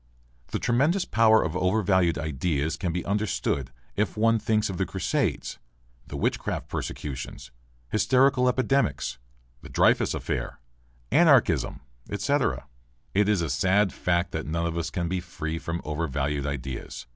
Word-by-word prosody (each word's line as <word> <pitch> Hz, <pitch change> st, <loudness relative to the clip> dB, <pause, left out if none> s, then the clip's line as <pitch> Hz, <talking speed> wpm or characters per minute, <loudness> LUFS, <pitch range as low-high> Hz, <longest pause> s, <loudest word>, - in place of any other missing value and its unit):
The -, -, -2 dB
tremendous 150 Hz, +10 st, +2 dB
power 110 Hz, -1 st, +4 dB
of 80 Hz, +1 st, -3 dB
overvalued 90 Hz, -3 st, +2 dB
ideas 75 Hz, +1 st, -1 dB
can 90 Hz, +1 st, -2 dB
be 90 Hz, +1 st, -3 dB
understood 85 Hz, -, -1 dB, 0.3 s
if 105 Hz, +1 st, -1 dB
one 115 Hz, +1 st, +3 dB
thinks 110 Hz, -1 st, +1 dB
of 95 Hz, -, -4 dB
the 95 Hz, -, 0 dB
crusades, 100 Hz, -, -1 dB, 0.5 s
the -, -, -6 dB
witchcraft -, -, -2 dB
persecutions, 65 Hz, -4 st, -5 dB, 0.4 s
hysterical 125 Hz, +2 st, +4 dB
epidemics, 125 Hz, -, 0 dB, 0.4 s
the -, -, -11 dB
Dreyfus -, -, +3 dB
affair, -, -, -3 dB, 0.5 s
anarchism, 70 Hz, -, +4 dB, 0.3 s
etc. -, -, 0 dB, 0.5 s
It 105 Hz, +1 st, +3 dB
is 100 Hz, -5 st, +2 dB
a 80 Hz, -, -2 dB
sad 95 Hz, +1 st, +2 dB
fact 85 Hz, 0 st, 0 dB
that 80 Hz, -1 st, -4 dB
none 85 Hz, +2 st, -1 dB
of 85 Hz, -1 st, -2 dB
us 85 Hz, -1 st, -2 dB
can 85 Hz, -1 st, -2 dB
be 90 Hz, +2 st, -1 dB
free 80 Hz, -2 st, -5 dB
from 85 Hz, +1 st, -4 dB
overvalued 75 Hz, -2 st, -2 dB
ideas. 65 Hz, -2 st, -5 dB
90 Hz, 140 wpm, -26 LUFS, 75-110 Hz, 0.5 s, power